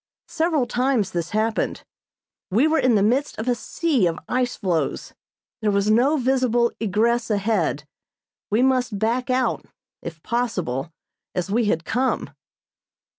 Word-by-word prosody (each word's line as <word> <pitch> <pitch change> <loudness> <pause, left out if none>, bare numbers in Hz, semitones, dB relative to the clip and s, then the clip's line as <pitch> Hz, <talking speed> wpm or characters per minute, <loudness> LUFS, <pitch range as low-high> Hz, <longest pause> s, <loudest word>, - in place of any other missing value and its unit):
Several 320 -5 +1
times 245 -5 0
this 170 -1 -3
happened. 215 +1 -1 0.7
We 220 +9 +3
were 315 +1 +2
in 250 -3 +3
the 200 - +3
midst 260 +7 +1
of 220 - -4
a 250 - +3
sea 255 - 0
of 165 0 -2
ice 250 -1 0
floes. 175 -4 -2 0.5
There 215 - +1
was 200 +1 +2
no 260 +8 +3
visible 250 -3 +2
egress 225 +3 +1
ahead; 200 -8 0 0.7
we 220 +4 +2
must 255 -5 +1
back 235 +5 0
out, 255 -2 0 0.4
if 160 -2 -8
possible, 180 - -2 0.4
as 180 +2 -2
we 230 +2 +2
had 165 -5 0
come. 255 +2 -1
230 Hz, 140 wpm, -23 LUFS, 200-255 Hz, 0.7 s, We